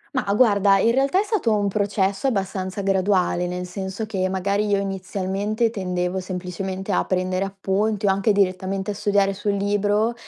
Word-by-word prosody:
Mah, 220 -6 0
guarda, 200 -4 +4
in 225 +4 +3
realtà 275 +8 +2
è - - +2
stato 415 - 0
un 205 -1 0
processo 200 +2 0
abbastanza 195 -3 -2
graduale, 190 -2 +1
nel 180 0 -4
senso 190 +3 -5
che 190 -3 -1
magari 200 +2 0
io 205 -1 +2
inizialmente 195 +3 -2
tendevo 180 -3 -2
semplicemente 185 +1 -5
a 180 - +2
prendere 185 0 -1
appunti 200 +2 -1
o - - +4
anche 195 +2 +2
direttamente 190 0 0
a - - -3
studiare 200 -1 +1
sul 205 +1 -2
libro 205 +3 +1
195 Hz, 165 wpm, -23 LUFS, 190-210 Hz, -, guarda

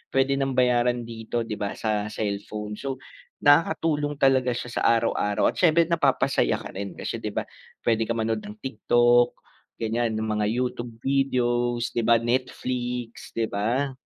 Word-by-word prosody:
pwede 135 +1 +2
nang 135 -1 -1
bayaran 125 -1 +2
dito, 115 0 -4
di 110 -2 -6
ba, 100 -1 -3
sa 105 -1 -1
cellphone. 105 0 -4
So, 135 -1 -3 0.5
nakakatulong 150 0 +3
talaga 130 -3 +3
siya 125 0 -5
sa - - -4
araw-araw. 115 -3 +2
At - - -9
siyempre, 170 -1 +5
napapasaya 145 -5 +2
ka - - -7
rin, 100 -1 -5
kasi - - -4
di - - -5
ba, - - -2 0.4
pwede 115 -1 +1
ka 115 - -1
manood 110 -1 0
ng 105 0 -9
TikTok, 120 0 +3 0.4
ganyan, 115 0 -1
ng 110 0 -2
mga 105 0 0
YouTube 120 0 -2
videos, 120 -3 +1
di - - -1
ba, 115 0 +4
Netflix, 125 0 -2
di 115 -1 -1
ba? 120 +8 0
120 Hz, 160 wpm, -25 LUFS, 110-130 Hz, 0.5 s, siyempre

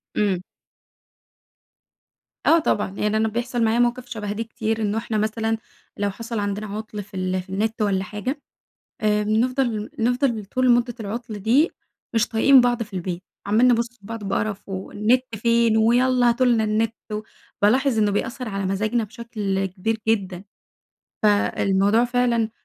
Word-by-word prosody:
إمم. 195 -4 +1 2.0
آه 335 - +6
طبعًا 210 -10 0
يعني 210 +1 +1
أنا 220 - +2
بيحصل 240 +2 -1
معايا 225 +1 +2
مواقف 245 +1 +1
شبه 210 -2 -4
دي 220 +2 -2
كتير 225 0 -3
إنّه 210 +1 0
إحنا 225 -1 -2
مثلًا 220 +1 0 0.4
لو 205 0 0
حصل 230 +3 -5
عندنا 205 +1 -2
عُطل 210 0 -6
في 205 - -23
ال 185 0 -1
في 185 - -18
النت 215 +3 -1
والّا 195 -2 +1
حاجة 250 +9 -4 0.6
بنفضل 215 +2 +1
نفضل 240 -1 +1
طول 255 +5 +1
مدة 240 0 +3
العطل 220 +1 -5
دي 245 - +3 0.4
مش 225 +1 +2
طايقين 255 +4 +6
بعض 245 -1 +1
في 215 -2 -9
البيت، 180 0 -4 0.2
عمالين 225 +5 +4
نبص 235 0 +1 0.2
لبعض 220 +1 -7
بقرف 205 +1 -2
والنت 210 +6 0
فين 230 0 +3
ويلّا 245 +2 +4
هاتوا 245 +2 +3
لنا 230 -3 +3
النت. 220 +1 0 0.2
و 210 0 -2 0.4
بالاحظ 250 +3 +3
إنّه 210 -1 +3
بيأثر 235 +4 -2
على 195 -1 -2
مزاجنا 215 +4 0
بشكل 210 -4 -3
كبير 205 +4 -2
جدًا. 195 -4 0 0.8
فالموضوع 205 +1 +3
فعلًا 240 -2 +1
220 Hz, 150 wpm, -23 LUFS, 205-240 Hz, 2.0 s, آه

